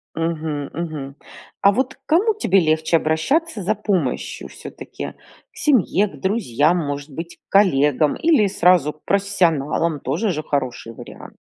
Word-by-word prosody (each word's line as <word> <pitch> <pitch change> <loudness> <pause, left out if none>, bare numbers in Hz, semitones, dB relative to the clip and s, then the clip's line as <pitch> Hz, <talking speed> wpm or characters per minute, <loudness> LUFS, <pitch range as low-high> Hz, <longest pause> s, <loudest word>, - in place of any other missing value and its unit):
Мгм 160 -3 -3
мгм. 155 -5 -5 0.5
А 200 - +6
вот 260 +4 -1
к - - -40
кому 395 +8 +3
тебе 195 - +2
легче 160 0 +2
обращаться 210 - 0
за 215 +4 0
помощью 190 - -2
всё-таки? - - -9 0.4
К - - -22
семье, 210 - +2
к - - -13
друзьям, 175 - +1
может 145 -2 -4
быть, 165 +4 -7
к - - -61
коллегам 150 -6 +3
или 310 -11 +3
сразу 180 -5 +3
к - - -30
профессионалам? 170 -6 +1
Тоже 170 - -1
же 155 -2 -4
хороший 130 -5 -3
вариант. - - -12
170 Hz, 145 wpm, -21 LUFS, 150-200 Hz, 0.5 s, А